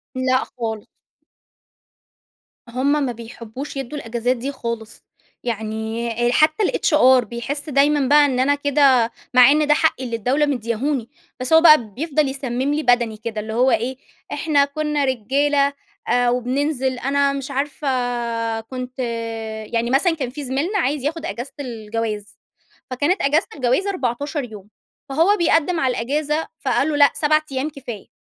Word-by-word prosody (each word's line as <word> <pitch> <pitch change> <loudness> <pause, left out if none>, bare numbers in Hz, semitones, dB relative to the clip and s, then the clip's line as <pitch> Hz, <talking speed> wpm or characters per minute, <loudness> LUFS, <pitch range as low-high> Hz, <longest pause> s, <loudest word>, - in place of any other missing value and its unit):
لأ 255 0 +1
خالص. 225 -4 -6 1.8
هم 280 +5 +1
ما 250 - -2
بيحبّوش 235 +4 -8
يدّوا 270 +2 -5
الأجازات 240 0 -1
دي 270 +4 -4
خالص. 230 -4 -6 0.4
يعني 220 0 -3 0.2
أ - - +1
حتّى 310 +8 +3
الHR 260 -9 +4
بيحس 275 +7 -5
دايماً 285 0 +3
بقى 295 +1 +6
إن 260 -3 0
أنا 280 +3 +3
كده 275 -5 +3 0.2
مع 250 +1 +8
إن 300 0 +2
ده 295 - +6
حقي 305 -4 +1
اللي 235 -2 -3
الدولة 255 +7 +1
مدّياهوني، 245 -1 -2 0.3
بس 255 +5 -1
هو 320 - +8
بقى 310 -6 +7
بيفضل 300 +2 0
يسمم 265 0 -2
لي 305 +1 -1
بَدَني 240 -4 +2
كده. 220 -1 -4
اللي 220 +1 -6
هو 250 +3 +3
إيه، 240 +3 0 0.4
إحنا 290 -3 +2
كُنّا 300 0 -1
رجالة 280 +3 +1 0.3
أ 245 0 +2
وبننزل، 255 +1 -1
أنا 280 +1 +1
مش 275 -1 -5
عارفة 285 +1 -3 0.7
كنت 255 +2 -8 0.7
يعني 230 +1 0
مثلًا 325 +7 +2
كان 270 -6 -3
في 285 +3 -7
زميلنا 290 +11 -1
عايز 290 -4 -1
ياخُد 320 +3 -3
أجازة 270 -4 -5
الجواز، 225 -4 -5 0.5
فكانت 290 +9 0
أجازة 295 +3 +2
الجواز 265 +8 +1
14 285 -3 -2
يوم. 210 -4 -10 0.4
فهو 335 +9 +3
بيقدّم 330 0 +2
على 260 -5 +1
الأجازة 295 +6 -1
فقال 265 +2 +1
له: 305 - -1
"لأ 285 -1 +6
7 305 0 +3
أيام 270 +3 -2
كفاية." 245 -8 -9
265 Hz, 150 wpm, -21 LUFS, 240-295 Hz, 1.8 s, مع